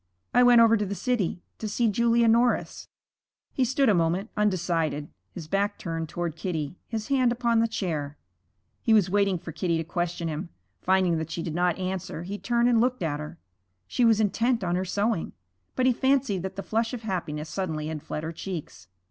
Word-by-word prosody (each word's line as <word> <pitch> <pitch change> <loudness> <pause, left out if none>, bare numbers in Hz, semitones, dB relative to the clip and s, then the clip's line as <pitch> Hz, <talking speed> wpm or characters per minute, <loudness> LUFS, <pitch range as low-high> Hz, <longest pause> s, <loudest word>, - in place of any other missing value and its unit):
'I 245 - +6
went 245 -1 +7
over 230 0 +6
to 210 - -1
the 200 - -3
city 205 -8 -1 0.2
to 220 - -3
see 235 +3 +1
Julia 235 +2 +3
Norris.' 235 +2 +2 0.7
He 265 - +1
stood 265 +2 +2
a 215 - +5
moment, 175 +4 0
undecided, 170 -7 0 0.2
his 170 -4 -8
back 200 +4 0
turned 165 -2 -4
toward 170 -1 -3
Kitty, 160 -2 -4
his 220 0 -4
hand 260 -3 +3
upon 235 -1 +1
the 230 - +3
chair. 155 -9 -3 0.6
He 225 - +4
was 195 -4 +3
waiting 200 -2 +2
for 165 - -8
Kitty 170 +1 -1
to 165 - -1
question 175 0 -2
him. 160 +2 -4 0.3
Finding 185 -3 +2
that 160 0 -4
she 165 - -4
did 165 - -4
not 175 0 +1
answer, 185 -2 -4
he 200 +3 -5
turned 240 0 +2
and 235 -2 +4
looked 250 -4 0
at 150 -2 -1
her. 155 +3 -7 0.5
She 245 - 0
was 225 -2 +5
intent 230 +2 +1
on 175 -1 0
her 185 +1 -1
sewing, 205 0 -1 0.4
but 255 - +1
he 255 - +5
fancied 260 -7 +1
that 190 +1 -5
the 195 - -5
flush 225 +2 -1
of 235 - -9
happiness 160 -7 -3
suddenly 160 -5 -3
had 155 -1 -4
fled 150 - -5
her 160 - -3
cheeks. 165 - -7
190 Hz, 200 wpm, -26 LUFS, 165-230 Hz, 0.7 s, went